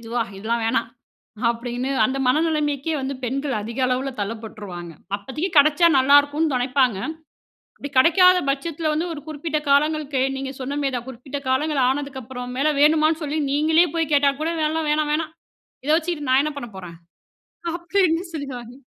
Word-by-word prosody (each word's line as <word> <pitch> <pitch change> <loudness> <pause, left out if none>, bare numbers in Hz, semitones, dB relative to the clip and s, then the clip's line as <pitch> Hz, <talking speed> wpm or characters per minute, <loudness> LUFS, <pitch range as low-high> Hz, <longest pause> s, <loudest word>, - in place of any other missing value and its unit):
இதுவா! 235 +1 -2 0.2
இதெல்லாம் 230 +3 -1
வேணாம்." 230 0 0 0.6
அப்படின்னு 245 +2 -4
அந்த 260 +5 0
மனநிலைமைக்கே 300 +1 +1
வந்து 270 +1 -3
பெண்கள் 275 +3 -2
அதிக 230 +5 -7
அளவுல 255 +2 -1
தள்ளப்பட்டுருவாங்க. 205 -5 -6 0.2
அப்பதைக்கு 270 - -4
கெடைச்சா 300 +3 +6
நல்லாருக்கும்ன்னு 285 +2 +4
நெனைப்பாங்க. 250 -3 +1 0.8
அப்படி 285 - -6
கெடைக்காத 365 +6 +6
பட்சத்தில 310 +3 -2
வந்து, 320 +3 -1
ஒரு 295 - -7
குறிப்பிட்ட 305 +1 -2
காலங்களுக்கு 295 -1 +2 0.2
நீங்க 270 0 -4
சொன்ன 280 +3 -3
மாரி 270 -2 -1
தான், 240 0 -6
குறிப்பிட்ட 265 +3 -7
காலங்கள் 285 +1 +1
ஆனதுக்கப்பறம் 260 -2 -4
மேல, 290 +3 +2
வேணுமான்னு 310 +2 +4
சொல்லி 300 +2 -2
நீங்களே 315 +4 +4
போய் 325 -2 0
கேட்டா 285 -1 +4
கூட, 320 +2 0 0.2
"எல்லாம் 315 -1 -1
வேணாம் 300 0 0
வேணாம். 315 +1 -1 0.5
இத - - 0
வச்சுகிட்டு 325 -4 -3
நான் 260 +2 +5
என்ன 305 - -2
பண்ண 240 - -7
போறேன்?" 175 -3 -9 0.8
அப்படின்னு 345 -1 +1
சொல்லிருவாங்க. 255 -6 -6
280 Hz, 150 wpm, -22 LUFS, 250-310 Hz, 0.8 s, கெடைச்சா